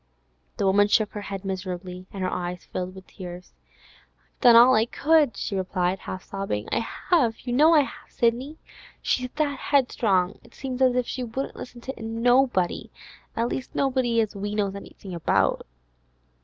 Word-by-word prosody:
The - - 0
woman 200 +2 +4
shook 210 0 +2
her 210 - -6
head 195 -1 -6
miserably; 185 -1 -5
her 190 -2 -2
eyes 180 -1 -4
filled 185 +1 -5
with 190 -1 -11
tears. 180 -2 -10 0.8
'I've - - -41
done 240 -1 +8
all 245 +2 +8
I 220 0 +3
could,' 295 -6 +3
she 200 - -3
replied, 185 0 -1
half 185 0 -7
sobbing. 195 - -4
'I - - +2 0.3
have; 245 -10 +3
you 245 - -4
know 310 +6 +6
I 300 - +7
have, 275 - -7
Sidney! 250 +6 0 0.5
She's 255 0 0
that 290 -3 0
'eadstrong, 210 -9 +2
it - - -19
seems 260 -1 -5
as 255 -1 +4
if 250 -1 +1
she 255 - -4
wouldn't 245 +4 -4
listen 245 -1 -9
to 265 -1 -7
nobody—at 230 -1 0
least 255 +1 -5
nobody 255 -4 +1
as 215 -1 -3
we 205 +1 -3
knows 200 -2 0
anything 195 -1 -10
about. 170 - +1
220 Hz, 170 wpm, -25 LUFS, 190-255 Hz, 0.8 s, done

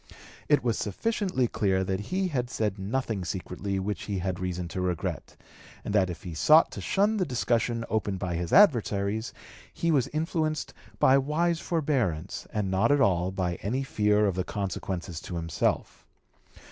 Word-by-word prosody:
It 145 -3 +4
was 115 -3 0
sufficiently 180 - 0
clear 95 -4 +1
that 95 0 -1
he 185 - -1
had 125 -6 -2
said 105 -5 -2
nothing 110 0 -2
secretly 95 +1 -4
which 100 +2 -3
he 100 -2 -2
had 90 0 -2
reason 90 -1 -3
to 90 - -3
regret; 90 -3 -3 0.5
and - - -3
that 95 -3 +3
if 90 - -7
he 90 - -6
sought 155 - +5
to - - -6
shun 205 +3 +2
the 190 - +2
discussion 120 -4 0
opened 105 -3 -1
by 90 -2 -3
his 85 0 -3
adversaries, 110 - +3 0.4
he 170 - 0
was 135 -6 +2
influenced 155 -1 -2 0.2
by 135 +1 +5
wise 160 +4 0
forbearance, 125 - -1
and 105 -3 -1
not 100 +6 +3
at 145 - +4
all 90 -8 +3
by 90 -2 -2
any 125 +7 -1
fear 105 -5 +2
of 100 - +1
the 90 +1 -1
consequences 90 -4 -4
to 90 - -7
himself. 80 -1 -1
105 Hz, 170 wpm, -28 LUFS, 95-135 Hz, 0.5 s, sought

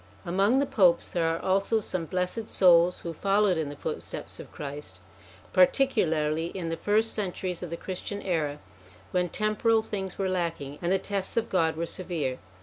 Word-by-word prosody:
Among 195 +8 +3
the 280 - +3
Popes 185 -10 +3
there 170 -2 +1
are 165 0 0
also 195 +4 +2
some 185 -5 -3
blessed 185 +6 -2
souls 175 -1 +5
'who 170 - -5
followed 195 +2 +2
in 160 -3 -2
the 145 - -7
footsteps - - -5
of - - -10
Christ, 140 -10 -7 0.5
particularly 165 - +3
in 175 -2 -5
the 165 - -1
first 215 +5 +1
centuries 185 -3 -3
of 180 - -5
the 170 - -4
Christian 190 +3 -5
era, 155 -6 -1 0.5
when 180 -1 +1
temporal 215 +3 +1
things 195 -4 -4
were 195 - 0
lacking 165 -6 -2
and 175 0 0
the 195 - +4
tests 195 +1 -4
of 230 - 0
God 165 -4 +2
were 170 - -1
severe. 165 -7 -3
180 Hz, 175 wpm, -28 LUFS, 165-200 Hz, 0.5 s, souls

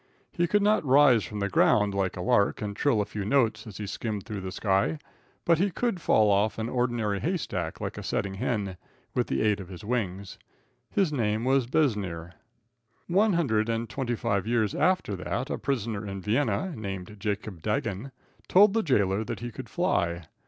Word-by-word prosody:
He 175 -1 0
could 205 +3 +2
not 210 -2 +3
rise 135 -5 +5
from 105 -1 -6
the 100 - +1
ground 105 0 +3
like 95 -2 -1
a - - -3
lark 120 -4 +2
and 105 -3 -4
trill 120 -3 +2
a - - -1
few 105 0 -5
notes 110 -2 +1
as 105 - -9
he 105 - -4
skimmed 105 0 -4
through 105 -4 -5
the 95 0 -5
sky, 100 +8 +1 0.5
but 170 -1 +4
he 200 +3 +2
could 195 0 -2
fall 110 -7 +4
off 100 +1 +2
an 115 +1 -2
ordinary 120 -5 0
hay 180 - 0
stack 85 - -4
like - - -4
a - - -5
setting 100 -1 -2
hen, 100 -2 -2 0.4
with - - 0
the 65 - 0
aid 105 -1 +2
of 95 - -8
his 90 0 -9
wings. 100 -5 -3 0.5
His 190 -7 +1
name 110 -3 0
was 135 -2 +2
Besnier. 100 - 0 0.7
One 200 +4 +3
hundred 115 -10 +1
and 115 0 -1
twenty 125 -2 -2
five 100 -2 -1
years 115 -3 +1
after 180 - +1
that - - -3
a - - -2
prisoner 110 -6 -2
at 100 - -5
Vienna, 115 - 0
named 100 -2 -6
Jacob 100 -3 -3
Dagen, 105 +4 -2 0.4
told 200 +2 +6
the 225 - +2
jailer 105 - +1
that - - -5
he 120 0 -5
could - - -9
fly. 85 0 0
110 Hz, 195 wpm, -27 LUFS, 100-135 Hz, 0.7 s, told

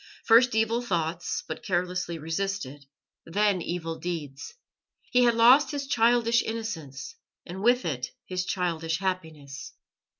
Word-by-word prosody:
First 235 +1 +5
evil 225 +2 +1
thoughts, 170 -5 -2
but 160 - -6
carelessly 180 -2 -2
resisted; 160 -4 -4 0.4
then 200 +1 +1
evil 165 -1 -4
deeds. 160 - -6 0.6
He 250 -1 +5
had 235 -1 +3
lost 245 +5 +6
his 285 -2 -3
childish 235 -2 +3
innocence, 160 -12 -5 0.3
and 185 +2 -7
with 245 +3 +3
it 130 -6 -2 0.2
his 180 -1 -2
childish 165 -3 -1
happiness. 160 -7 -5
180 Hz, 125 wpm, -27 LUFS, 160-230 Hz, 0.6 s, lost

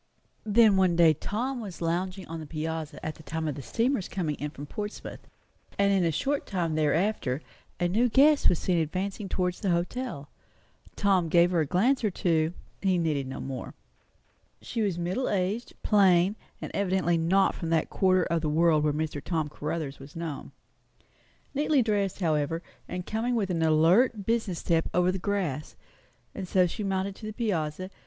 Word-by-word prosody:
Then 215 -1 +5
one 185 -2 +3
day 165 -2 +6
Tom 245 - -3
was 195 -6 -8
lounging 180 +3 -2
on 165 0 -6
the 155 - -8
piazza 160 -1 -4
at 155 - -2
the - - -15
time 160 +1 -4
of 150 - -1
the 140 - -7
steamer's 230 - 0
coming 170 -6 -2
in 150 - -3
from 145 0 -9
Portsmouth; 210 +7 -7 0.5
and 200 0 +3
in 190 -2 +3
a 165 - +2
short 280 - -1
time 175 -5 -1
thereafter 155 -2 0 0.4
a 175 - +2
new 225 +7 +2
guest 285 +4 +5
was 175 - +2
seen 175 0 +1
advancing 190 +5 -3
towards 180 -1 -1
the 195 - -1
hotel. 175 - -2 0.7
Tom 190 -5 +2
gave 175 +2 +5
her 175 - +2
a 155 - +1
glance 240 - +2
or 215 - +3
two; 165 -4 +1 0.3
he 190 -2 +2
needed 150 -5 0
no 130 - -6
more. 130 -2 -6 0.8
She 230 - -4
was 195 -5 0
middle 180 +9 -1
aged, 200 +4 -1
plain, 190 -2 +4 0.2
and - - -6
evidently 185 -3 +1
not 190 +4 +3
from 165 - -5
that 165 -1 +1
quarter 185 -1 +3
of 170 -1 0
the 155 - -1
world 155 0 +3
where 150 -1 +2
Mr. 150 -1 -3
Tom 160 -4 -1
Caruthers 150 -1 -4
was 135 +2 -12
known. 165 -4 -5 1.0
Neatly 290 -2 +2
dressed, 205 -3 -1
however, 160 0 0 0.3
and 180 0 -4
coming 235 +3 -1
with 200 -5 0
an 165 -2 -1
alert, 180 +8 +4
business 225 -5 0
step 165 -1 0
over 180 +1 +3
the 190 - -3
grass, 180 -7 -2 0.6
and 190 -2 -5
so 185 0 +4
she 210 +5 -4
mounted 195 0 -1
to 215 - -8
the 215 - -5
piazza. 185 -5 -2
180 Hz, 180 wpm, -28 LUFS, 160-200 Hz, 1.0 s, day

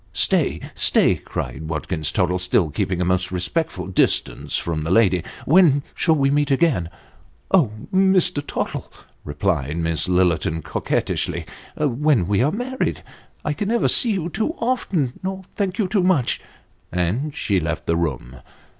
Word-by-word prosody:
" - - -33 0.2
Stay - - +1
stay," - - +4
cried 80 - -6
Watkins 80 0 -1
Tottle, 90 -1 0
still 90 -3 +1
keeping 90 +4 -1
a - - +1
most 90 +1 +1
respectful 90 - -2
distance 95 0 0
from 80 -2 -2
the 80 - -3
lady; 95 -3 +3
" - - -15
w' 165 +7 +5
"n 145 -4 +3
shall 160 -2 +2
we 135 -2 +2
meet 145 0 +1
again? 135 - +2 0.2
" - - -30
" 70 +2 -35
Oh! 160 - +4 0.2
Mr. 185 -5 +3
Tottle," - - -4 0.3
replied 75 -1 -1
Miss 80 0 0
Lillerton, 85 -3 +1
coquettishly, - - -2 0.2
" - - -22
when 145 - +2
toe 100 +4 +1
are 140 +4 +2
married, 250 +6 -3 0.4
I 150 - 0
can 200 +7 -3
never 235 +2 +2
see 230 -3 +4
you 175 -4 -2
too 220 - -2
often, 195 - -1
nor 190 0 -4
thank 195 -2 -2
you 210 -5 +1
too 195 +1 +1
much; 180 -9 +1 0.3
" - - -39
and 105 - -1
she 100 -3 0
left 80 -2 -3
the 85 - +1
room. 65 -6 -3
115 Hz, 170 wpm, -21 LUFS, -, 0.4 s, w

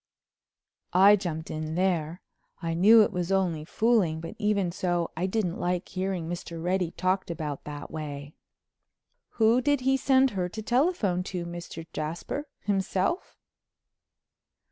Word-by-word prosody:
I 195 +3 +7
jumped 165 -5 -4
in 155 0 -4
there. 175 -2 0 0.4
I 165 -2 -2
knew 215 +6 +7
it - - -1
was 180 -1 -2
only 180 -5 +1
fooling, 200 -3 +2
but 165 - -7
even 200 -4 +1
so 175 -1 -1
I 175 +4 -1
didn't 190 -3 -1
like 180 0 -1
hearing 185 -3 -2
Mr. 170 -1 -5
Reddy 180 +1 0
talked 185 +2 -1
about 150 -4 -4
that 145 -1 -7
way. 145 -2 -6 1.0
"Who 230 +2 +4
did 285 +1 +2
he 265 +1 +3
send 265 -1 +3
her 180 -3 -2
to 220 +4 -7
telephone 240 - +1
to, 180 -3 -4
Mr. 170 -1 -7
Jasper—himself?" 195 - -2
180 Hz, 135 wpm, -27 LUFS, 165-210 Hz, 1.0 s, I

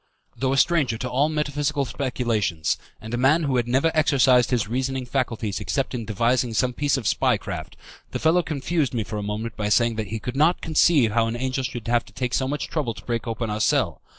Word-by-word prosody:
Though 130 0 -1
a - - 0
stranger 140 -7 +2
to 125 - -4
all 135 +4 +1
metaphysical 145 -1 -1
speculations, 115 - -1 0.2
and 110 +2 -8
a - - 0
man 140 +7 +3
who 135 -3 +1
had 120 -1 0
never 135 +7 +2
exercised 130 -5 +4
his 120 -5 0
reasoning 130 +2 -2
faculties 115 -6 -2
except 135 -3 -2
in 120 -3 -4
devising 115 +2 0
some 125 +3 +1
piece 145 +1 +1
of 125 - -5
spy - - +2
craft, - - -7 0.3
the - - -3
fellow 165 +3 +3
confused 150 -2 -1
me 115 - 0
for 105 +2 -6
a - - -3
moment 105 +2 -4
by 105 -1 -2
saying 115 +1 +2
that 110 -2 -2
he 110 +3 -4
could 125 +3 -5
not 155 +5 +3
conceive 155 -7 +3
how 115 +1 +2
an 115 - -3
angel 130 +1 -2
should 120 -2 -5
have 120 0 +2
to - - -18
take 125 -1 -3
so 130 - +1
much 145 +1 -3
trouble 135 -8 -2
to - - -12
break 120 -1 -2
open 115 -1 -3
our 105 +1 -2
cell. - - +1
125 Hz, 230 wpm, -24 LUFS, 115-140 Hz, 0.3 s, exercised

